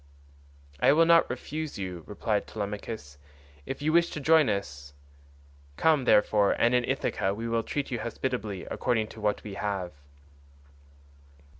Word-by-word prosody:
"I 140 - +5
will 165 +2 +5
not 170 0 +5
refuse 150 +3 -5
you," 90 -4 -5
replied 105 0 -2
Telemachus, 100 -8 -6 0.5
"if 135 +2 -5
you 155 +1 +1
wish 170 0 +4
to - - -5
join 155 0 +4
us. 70 -8 -4 0.8
Come, 155 -5 +3
therefore, 105 -2 +4
and 120 +1 +2
in 125 0 +3
Ithaca 95 +1 -1
we 115 +2 -4
will 115 0 +1
treat 140 +4 -4
you 120 - -2
hospitably 110 -4 -4
according 115 -4 0
to 110 - -11
what 105 -1 0
we 105 - -7
have." 100 -3 -3
110 Hz, 145 wpm, -28 LUFS, 100-135 Hz, 0.8 s, I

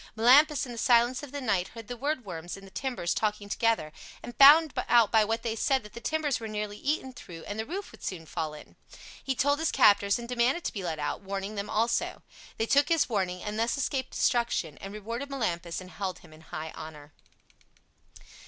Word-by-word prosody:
Melampus 275 +5 +5
in 250 - -8
the 235 - -6
silence 240 +1 +3
of 290 -3 -9
the 285 - -4
night 200 -8 0
heard 230 -2 -11
the 245 - -5
woodworms 205 - -4
in 195 - -12
the 195 - -14
timbers 245 -11 -2
talking 210 -1 -1
together, 210 -8 0 0.3
and 240 - -8
found 295 +2 +8 0.2
out 235 -3 +5
by 220 -1 +5
what 225 +2 -2
they 225 -2 -2
said 265 +2 +1
that 210 - -13
the 235 - -8
timbers 295 -2 -1
were 225 - -6
nearly 210 -1 -4
eaten 270 -2 -2
through 170 -8 -11
and 205 +1 -6
the 220 - -3
roof 380 +6 -5
would - - -16
soon 170 -4 -5
fall 155 0 -4
in. 150 - -14 0.5
He 265 - -1
told 285 +3 +2
his 320 - +1
captors 200 -1 +5
and 235 0 -7
demanded 250 +7 +1
to - - -3
be 195 - -5
let 165 -3 -3
out, 145 -1 -3
warning 195 +1 -4
them 200 -1 -4
also. 230 +2 0 0.3
They 225 - 0
took 285 +5 +3
his 330 -5 +2
warning, 185 -5 -1
and 210 +1 -4
thus 230 +4 +1
escaped 270 -1 -1
destruction, 235 - 0
and 195 - -7
rewarded 230 +6 -5
Melampus 175 -11 -2
and 185 0 -11
held 190 -3 -4
him 155 - -16
in 155 - -15
high 160 0 -7
honor. 150 -1 -10
225 Hz, 215 wpm, -28 LUFS, 190-260 Hz, 0.5 s, found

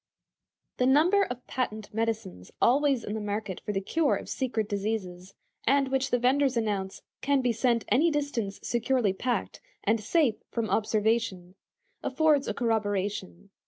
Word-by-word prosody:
The 250 - +2
number 325 +9 +5
of 250 0 -7
patent 220 -5 -3
medicines 220 - -3
always 275 -1 +3
in 205 - -4
the 220 - -3
market 205 -2 -4
for - - -3
the 195 -1 -1
cure 310 +9 +1
of - - -7
secret 235 -5 -1
diseases, 195 -3 -4 0.3
and 275 -1 +3
which 270 0 0
the 245 - +2
vendors 260 +1 +2
announce 200 -4 -2 0.2
"can 280 0 +2
be 245 - +2
sent 235 0 +1
any 310 +7 +4
distance 285 -10 -2
securely 240 -3 +1
packed, 245 +6 -2 0.2
and 220 +1 +2
safe 245 0 +2
from 225 -4 -2
observation," 210 -3 0 0.5
affords 295 0 +2
a - - -1
corroboration. 205 -4 -2
230 Hz, 150 wpm, -28 LUFS, 205-265 Hz, 0.5 s, number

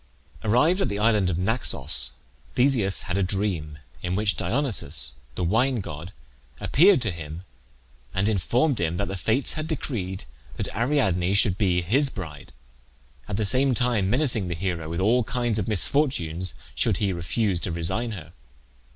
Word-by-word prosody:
Arrived 150 - +2
at - - 0
the 100 - -3
island 105 -3 +2
of 85 - -1
Naxos, 90 - +4 0.3
Theseus 125 -7 +2
had 95 0 -2
a - - +1
dream, 90 -6 -2 0.2
in 90 +1 -2
which 105 0 +1
Dionysus, 100 - -1 0.2
the - - -3
wine 120 +8 +1
god, 80 -2 -7 0.5
appeared 175 0 +4
to 110 - -1
him, 80 +1 -8 0.7
and 95 +2 0
informed 120 - +1
him 85 0 -1
that 100 - -2
the 95 - -4
Fates 110 - -1
had 155 0 -4
decreed 100 - -4 0.3
that - - -4
Ariadne 100 - +1
should 100 -2 +5
be 90 -4 +1
his 135 - +2
bride, 80 - -9 0.8
at 100 - -3
the 110 - 0
same 130 +4 +3
time 115 -6 +1
menacing 120 -5 +1
the 85 - -3
hero 85 -3 -3
with 85 +1 -3
all 120 +5 +3
kinds 120 -2 -1
of 95 - -3
misfortunes 95 - +1 0.2
should - - +1
he 100 -3 -1
refuse 90 +2 -1
to 90 - -4
resign 85 +8 -3
her. 80 -4 -10
100 Hz, 160 wpm, -24 LUFS, 90-120 Hz, 0.8 s, should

